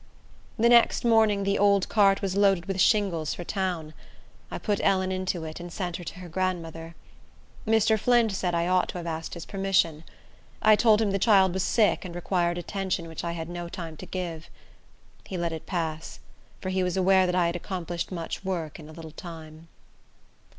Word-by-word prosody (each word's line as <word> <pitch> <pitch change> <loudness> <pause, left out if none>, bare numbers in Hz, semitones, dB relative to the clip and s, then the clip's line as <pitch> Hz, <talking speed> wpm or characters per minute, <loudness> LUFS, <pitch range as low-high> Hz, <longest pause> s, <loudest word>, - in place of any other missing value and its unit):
The 230 +1 +4
next 240 0 +5
morning 220 -3 +4
the 200 0 0
old 200 -1 +3
cart 200 -2 +3
was 195 -1 -1
loaded 195 -3 +3
with 195 -1 -1
shingles 185 -7 +2
for 175 - -6
town. 175 -5 -3 0.6
I - - -5
put 205 -2 -1
Ellen 190 -1 +2
into 185 -2 -2
it, 155 +1 -7
and 175 0 -8
sent 175 -2 -3
her 175 - -9
to 175 - -8
her 180 - -8
grandmother. 165 -2 -3 0.7
Mr. 220 0 +3
Flint 240 0 +3
said 180 -2 -1
I 170 0 +1
ought 185 0 +2
to - - -5
have 175 - -6
asked 165 0 -4
his 170 - -7
permission. 190 -5 0 0.6
I 215 0 +6
told 220 0 +4
him 205 - 0
the 195 - 0
child 190 -3 +4
was 190 - -1
sick, 215 +2 +2
and 175 -2 -8
required 175 -1 0
attention 185 -1 -3
which 160 -1 -7
I 170 0 -2
had 165 -1 -5
no 175 0 -6
time 170 -3 -7
to - - -9
give. 170 -3 -5 0.8
He 190 - -4
let 170 -1 -2
it 160 - -7
pass; 160 -4 -4 0.4
for 185 - -3
he 190 0 0
was 180 +1 -1
aware 190 0 +4
that 180 - 0
I 180 -1 +3
had 170 +1 -1
accomplished 175 -1 -4
much 170 +1 -5
work 170 -6 -4
in 155 -1 -11
a - - -11
little 160 -1 -9
time. 160 -1 -10
180 Hz, 200 wpm, -26 LUFS, 170-195 Hz, 0.8 s, I